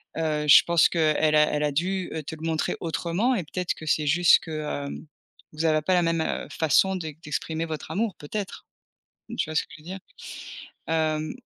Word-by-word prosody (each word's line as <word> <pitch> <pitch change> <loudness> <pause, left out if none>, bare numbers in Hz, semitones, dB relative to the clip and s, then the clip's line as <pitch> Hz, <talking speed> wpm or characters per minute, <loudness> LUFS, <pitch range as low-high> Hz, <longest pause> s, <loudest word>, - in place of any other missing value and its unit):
Heu, 155 -2 -1
je 145 - +9
pense 170 -2 +4
qu'elle 155 -1 +2
a 150 - +6
elle 150 - 0
a 145 -1 0
dû, 185 +5 -1
heu, 160 - -4
te 155 - -6
le 155 - -15
montrer 160 -1 -1
autrement 175 +9 0
et 195 - -1
peut-être 180 +3 -3
que 160 - -11
c'est 150 -1 +1
juste 175 +4 +6
que, 155 -2 -5 0.3
hem, - - -7 0.5
vous 155 +2 -3
avez 155 -1 +3
pas 185 - +1
la 175 -1 +3
même, 165 -1 +1
heu, - - -2
façon 165 +5 +2
d'e 160 -4 -5
d'exprimer 160 +1 -3
votre 155 -2 -6
amour 210 -2 -1
peut-être? 195 +7 -6 0.7
Tu - - -1
vois - - -5
ce - - +2
que - - -26
je 155 - -17
veux - - -21
dire? 190 +2 -6 0.9
Hem 155 -1 0
160 Hz, 210 wpm, -25 LUFS, 155-175 Hz, 0.9 s, je